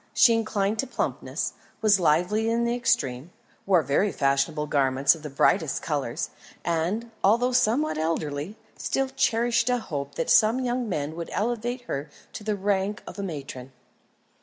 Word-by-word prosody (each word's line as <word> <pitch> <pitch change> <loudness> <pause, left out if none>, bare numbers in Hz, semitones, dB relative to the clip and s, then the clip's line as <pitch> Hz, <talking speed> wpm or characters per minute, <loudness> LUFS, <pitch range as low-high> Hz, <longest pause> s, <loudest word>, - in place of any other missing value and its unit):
She 235 - +6
inclined 215 -2 0
to - - 0
plumpness, 255 - -3 0.3
was 210 -3 +4
lively 180 +7 +2
in 230 +1 +1
the 235 0 +1
extreme, 145 - 0 0.4
wore 180 -5 +4
very 145 +9 +1
fashionable 140 +2 +1
garments 140 -1 +3
of 165 - -10
the 150 - -6
brightest 140 - +1
colours, - - -2 0.3
and 175 +8 -1
although 235 +6 +4
somewhat 250 - +2
elderly 155 +3 -2 0.2
still 270 0 -1
cherished 240 -2 +1
a 250 - +2
hope 145 - -5
that 165 - -2
some 220 +4 +5
young 245 -2 -1
man 155 -3 -2
would 170 0 -6
elevate 240 +3 -2
her 145 - -5 0.2
to - - -7
the 210 0 -1
rank 200 +1 -1
of 195 - -9
a - - -2
matron. 135 -7 -7
200 Hz, 160 wpm, -26 LUFS, 150-235 Hz, 0.4 s, She